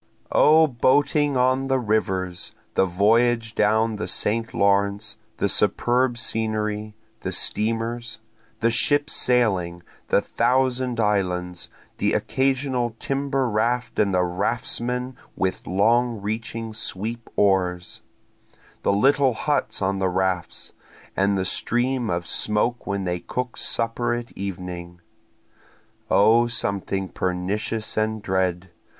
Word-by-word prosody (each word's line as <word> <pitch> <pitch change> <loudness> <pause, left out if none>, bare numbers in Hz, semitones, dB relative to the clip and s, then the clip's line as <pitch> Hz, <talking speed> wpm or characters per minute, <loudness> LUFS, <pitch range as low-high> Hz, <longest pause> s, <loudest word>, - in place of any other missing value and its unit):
O 160 +1 +6
boating 145 +2 +2
on 130 +1 +2
the 135 0 +2
rivers, 95 -6 -1 0.2
The 95 - +2
voyage 115 +5 +2
down 110 +1 +2
the 105 - -4
St. 115 +2 0
Lawrence, 100 +2 +1 0.2
the - - +1
superb 120 +5 +2
scenery, 110 -2 -2 0.2
the 95 - -4
steamers, 115 +4 0 0.4
The 115 +1 +3
ships 145 +5 +2
sailing, 95 -9 +1 0.2
the - - +3
Thousand 130 -1 0
Islands, 90 -4 -1 0.3
the - - +1
occasional 130 -3 0
timber 135 -1 -1
raft 115 +2 -1
and 100 -2 +3
the 90 -1 +2
raftsmen 120 +7 -2 0.2
with 95 -1 -2
long 115 +5 +2
reaching 110 +2 -4
sweep 110 +2 -3
oars, 90 -3 +1 0.8
The - - +1
little 135 +3 +3
huts 145 -5 0
on 95 +1 0
the 95 -1 +1
rafts, 90 -1 -2 0.4
and 100 +1 +2
the 95 - -1
stream 120 +4 0
of 85 0 -2
smoke 105 +6 0
when 100 -1 -2
they 90 -1 -2
cook 125 +6 -4
supper 115 +1 -1
at 120 0 -6
evening. 90 -2 -6 1.1
(O 115 +4 +5
something 100 -4 -2
pernicious 95 +5 -3
and 110 0 0
dread! 95 -1 -1
110 Hz, 115 wpm, -23 LUFS, 95-120 Hz, 1.1 s, O